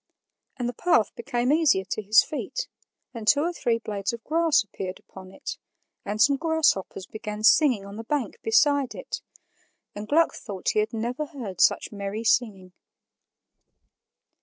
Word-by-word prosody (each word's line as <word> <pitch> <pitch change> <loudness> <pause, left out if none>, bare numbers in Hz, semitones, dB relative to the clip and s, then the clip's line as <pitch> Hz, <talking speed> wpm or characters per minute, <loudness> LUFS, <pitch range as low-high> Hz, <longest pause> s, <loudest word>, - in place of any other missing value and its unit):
And 245 -2 -2
the 245 - -3
path 240 - +2
became 245 +1 -1
easier 305 -12 +3
to - - -1
his 215 +2 +5
feet, - - -4 0.5
and 225 -3 -7
two 285 - +5
or 345 +3 -1
three 240 -8 0
blades 205 -3 -3
of 235 -1 -8
grass 325 -4 +2
appeared 190 -2 -6
upon 185 -1 -13
it, - - -7 0.4
and 205 +1 -4
some 275 +4 +5
grasshoppers 315 - 0
began 215 0 -7
singing 240 -4 +4
on 200 +1 -9
the 225 - -6
bank 295 - -2
beside 285 - +2
it, 185 - -6 0.7
and 205 +1 -7
Gluck 325 +7 +3
thought 195 -4 -4
he - - +1
had 215 +1 0
never 245 +7 -3
heard 235 - -6
such - - +3
merry 200 +1 -5
singing. 200 -6 0
230 Hz, 160 wpm, -25 LUFS, 205-290 Hz, 0.7 s, his